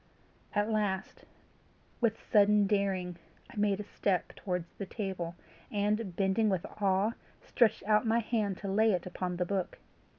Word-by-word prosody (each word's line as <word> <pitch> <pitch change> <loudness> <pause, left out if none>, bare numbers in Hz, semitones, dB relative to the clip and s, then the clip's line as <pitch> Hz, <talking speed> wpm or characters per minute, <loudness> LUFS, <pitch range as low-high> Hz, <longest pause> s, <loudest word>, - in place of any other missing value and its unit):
At 205 +2 +1
last, 205 -3 -1 0.7
with 230 -2 +1
sudden 210 -1 +4
daring, 190 -3 0 0.3
I - - -14
made 205 -2 +1
a - - -3
step 195 -2 -1
towards 180 -3 -4
the 200 - -4
table, 185 -5 -4 0.4
and, 205 -2 0
bending 195 +3 +2
with 190 -3 0 0.2
awe, 195 +2 +3 0.3
stretched 235 -4 +2
out 215 +2 +3
my 225 +1 +3
hand 215 -4 0
to 200 - -4
lay 215 +2 +3
it 175 -2 -1
upon 180 0 -3
the 180 - 0
book. 190 -1 -2
200 Hz, 155 wpm, -31 LUFS, 185-215 Hz, 0.7 s, sudden